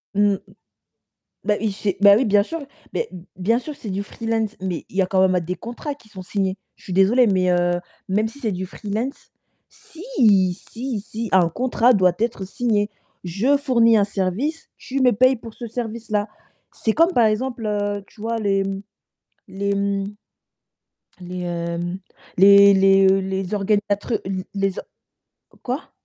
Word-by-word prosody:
Mmh, 205 -1 +3 1.1
bah, 210 -1 +2
il 215 -2 0
s'est 200 -1 -2
bah 200 0 +8
oui, 260 - +2
bien 205 -1 +4
sûr, 330 +9 -5 0.3
mais 470 - -2
b 175 -1 -10
bien 220 +6 +1
sûr, 300 +3 -7
c'est 210 - -7
du 195 +2 -2
freelance, 225 0 -3
mais 185 -3 -3
il 190 - -12
y 195 - +4
a - - 0
quand 190 0 +1
même 185 -1 +1
des 180 +2 -3
contrats 240 - -6
qui 225 -6 -22
sont 190 -3 -9
signés. 190 0 -2 0.2
Je - - -21
suis 185 - -6
désolée, 215 +7 +4
mais 185 -2 +2
heu, 175 0 +2 0.4
même 215 +3 +1
si 280 - -14
c'est 220 -5 -1
du 185 +1 -4
freelance 215 +7 -5 0.4
si! 330 +2 -14 0.7
Si, 235 -2 -4
si, 225 +2 -6
un 180 -3 +5
contrat 245 +4 +2
doit 185 -3 +4
être 225 -4 -1
signé, 210 0 0 0.3
je 210 +12 +2
fournis 235 -5 +3
un 205 - +4
service, 210 - -2
tu 270 +1 -4
me 250 -1 +5
paies 255 +5 +4
pour 225 -2 -10
ce 240 - -7
service-là. 220 -2 -3 0.4
C'est 220 - -1
comme 335 +6 +3
par 235 - +4
exemple, 235 +2 -1
heu, 205 -1 -1
tu 215 - -19
vois, 230 +1 -2
les 195 -2 +1 0.9
les, 200 +1 -2
mmh, 200 0 -1 1.2
les 180 0 -6
hem, 175 +1 -3 0.4
les 200 +1 +8
les, 195 0 +5
heu, 195 0 +4
les 190 0 -3
organisateurs 205 +2 0
l 190 -1 -3
les 195 -1 -1
o - - -4
q - - -31 0.6
quoi? 260 +6 -4
205 Hz, 175 wpm, -22 LUFS, 190-230 Hz, 1.2 s, bah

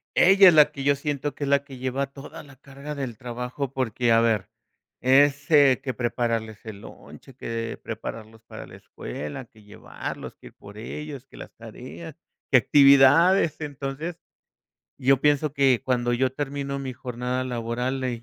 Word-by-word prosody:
ella 195 +1 +7
es 175 - +7
la 150 -1 +6
que, 140 -2 -7
yo 140 0 +3
siento 145 0 -4
que 145 - -6
es - - -2
la 140 0 +3
que 135 -3 -12
lleva 130 +2 -2
toda 135 0 -11
la 140 -2 -16
carga 140 +2 -9
del 130 -5 -5
trabajo 125 +2 -5
porque, 125 -2 -1
a 115 0 +5
ver, 115 -2 0 0.5
es, 140 +3 +3
eh, 140 -4 +5
que 130 -2 -3
prepararles 115 -3 -2
el 105 -2 -9
lonche, 130 +3 -14
que 115 -3 -5
prepararlos 110 0 -8
para - - -9
la - - -14
escuela, 75 - -8
que 110 -1 -22
llevarlos, 105 - -8
que - - -15
ir - - -16
por 100 +1 -13
ellos, 140 +2 -8
que - - -16
las - - -11
tareas, 125 +8 -10 0.4
que 130 - +7
actividades. 145 +7 +5
Entonces, 145 +3 -5 0.8
yo 135 +1 +3
pienso 145 0 +2
que, 135 -4 +2
cuando 120 -1 0
yo 130 +1 +1
termino 140 0 -4
mi 135 -2 -5
jornada 125 +1 -4
laboral, 125 +2 -3
eh, 120 -2 -3
130 Hz, 170 wpm, -24 LUFS, 120-140 Hz, 0.8 s, ella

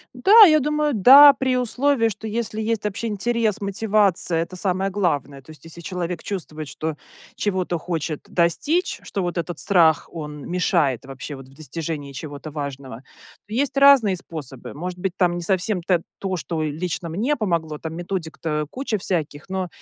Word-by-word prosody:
Да, 410 - +8
я 310 -1 +5
думаю, 300 0 0
да, 275 +7 +9
при 260 -1 0
условии, 250 0 +1
что 220 +2 -7
если 220 0 -3
есть 220 -1 -1
вообще 210 +3 -3
интерес, 220 0 -1
мотивация, 200 -4 +1
это 175 +2 -6
самое 190 +1 -1
главное. 145 -8 -2
То 160 - -14
есть, 155 -1 -16
если 165 +1 -10
человек 175 -1 -4
чувствует, 155 -6 -6
что 155 +2 -4 0.4
чего-то 185 -4 -1
хочет 160 -2 -4
достичь, 285 - 0
что 195 - -4
вот 175 0 -3
этот 170 -1 -4
страх, 170 -6 +3
он 150 -1 -7
мешает 170 - +1
вообще 135 +2 -8
вот 135 -1 -12
в 135 - -19
достижении 155 -1 -6
чего-то 145 +1 -8
важного, 140 -4 -7 0.4
то 210 - -9
есть 275 +3 -1
разные 275 -8 +6
способы. 150 -7 -9
Может 180 +4 -6
быть, 180 0 -3
там 175 -2 +2
не 175 - -4
совсем 190 0 0
та 180 -2 +2 0.2
то, 190 -2 -3
что 160 -1 -3
лично 165 +2 -3
мне 230 - 0
помогло. 170 -8 -2
Там 160 +1 -7
методик-то 165 -3 -3
куча 255 -5 -2
всяких, 160 -5 -3
но, 190 -1 -3
180 Hz, 170 wpm, -22 LUFS, 155-215 Hz, 0.4 s, да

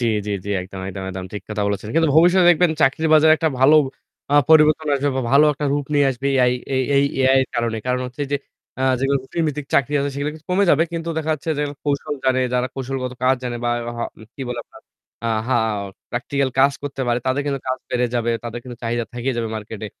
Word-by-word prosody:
জ্বি, - - 0 0.2
জ্বি, 105 - -2
জ্বি। 100 - -4
একদম, 95 +1 -9
একদম, 95 0 -6
একদম 95 0 -6
ঠিক 105 -2 -6
কথা 105 -1 -2
বলেছেন। 100 +1 -3
কিন্তু 165 0 +3
ভবিষ্যতে 175 +2 +5
দেখবেন 175 0 +4
চাকরির 150 +4 +2
বাজারে 155 0 +6
একটা 160 0 +1
ভালো 145 +4 +7 0.6
আ - - +4 0.2
পরিবর্তন 155 0 +5
আসবে 140 +1 0
বা 130 - 0
ভালো 145 +2 +7
একটা 145 +1 -5
রূপ 145 -1 -1
নিয়ে 145 -1 +4
আসবে 130 +2 -4
AI. 125 -1 +4 0.2
এই 130 - +2
এই 140 - +4 0.2
AI 135 - +5
এর - - -4
কারণে। 115 -1 -1
কারণ 125 0 0
হচ্ছে 125 +3 -6
যে - - +3 0.4
আ - - 0 0.2
যেগুলো 135 +1 +1
রুটিন 165 +5 -3
ভিত্তিক 150 -1 -3
চাকরি 140 +1 +2
আছে 140 0 -1
সেগুলো 145 +1 -2
কিছু 160 - -15
কমে 190 +3 +3
যাবে। 155 +3 +4
কিন্তু 165 0 -4
দেখা 160 0 -2
যাচ্ছে 155 +2 -5
যে 150 - +1 0.2
কৌশল 145 0 -1
জানে, 130 0 +2
যারা 125 0 +1
কৌশলগত 130 -1 -4
কাজ 130 +1 +4
জানে 120 -1 -3
বা 120 - +1 0.3
হা - - -1 0.3
কি 135 - -6
বলে 125 - -4
আপনার - - -17 0.4
আ - - +1 0.2
হা 130 - +3 0.5
প্র্যাকটিক্যাল 135 +2 -1
কাজ 140 +1 +5
করতে 140 -2 -4
পারে। 120 0 +2
তাদের 130 +2 +1
কিন্তু 140 -2 -1
কাজ 130 - -1
বেড়ে 125 0 +1
যাবে, 120 -1 0
তাদের 120 0 -5
কিন্তু 125 -2 -8
চাহিদা 120 0 -1
থেকে 120 +2 -2
যাবে 115 -1 -2
মার্কেটে। 110 0 -7
135 Hz, 230 wpm, -21 LUFS, 120-150 Hz, 0.6 s, ভালো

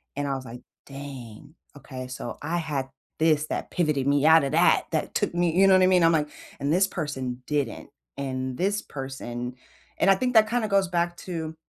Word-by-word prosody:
and 145 0 -2
I 135 - -1
was 130 -1 -7
like, 120 +1 -9 0.2
"Dang. 135 -1 -10 0.2
Okay, 130 -3 -8
so 125 -1 -6
I 165 +4 -2
had 145 -5 -3 0.3
this 155 -1 +2
that - - -4
pivoted 150 -6 0
me 145 0 +3
out 160 -1 +7
of 135 - -1
that, 170 +3 +4
that 155 -2 -2
took - - 0
me" 175 -1 +1
you 195 - +7
know 195 - +6
what 185 - +5
I - - +5
mean? 180 -2 +4
I'm 165 - +5
like, 150 -2 +1 0.3
"And 140 +1 -1
this 190 +3 +4
person 130 -8 -4
didn't, 145 -6 -2 0.3
and 130 -2 -3
this 200 +3 0
person" 125 -3 -6 0.4
and, 195 - +3
I - - +5
think 250 +4 -1
that, 215 -1 +6
kinda 235 -1 0
goes 195 -2 +2
back 175 -1 -1
to 160 -3 -5
150 Hz, 210 wpm, -26 LUFS, 135-175 Hz, 0.4 s, out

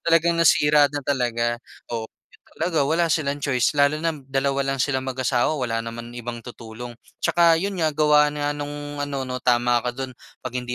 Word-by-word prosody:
Talagang 170 0 +3
nasira 150 -2 +5
na 145 - -2
talaga, 120 -4 0 0.3
oo. 115 -1 -3 0.2
Ganun - - -25
talaga 165 -4 0
wala 170 +2 +2
silang 145 -2 0
choice, 130 0 +1
lalo 145 +1 +3
na 165 0 +1
dalawa 135 +1 0
lang 135 - -4
silang 130 -2 -1
mag-asawa, 130 +2 0
wala 115 -3 -1
naman 115 +1 -7
ibang 120 0 -6
tutulong. 120 0 -9 0.3
Tsaka 170 -1 +4
'yon 195 +3 -2
nga, 160 -2 +2
gawa 150 0 +5
nga 145 0 -1
nung 145 0 -6
ano 140 -2 -3
'no, 125 0 -4
tama 120 0 +3
ka 125 - 0
do'n, 130 0 -5 0.3
'pag 130 -1 -6
hindi 125 0 -3
135 Hz, 185 wpm, -23 LUFS, 120-150 Hz, 0.3 s, nasira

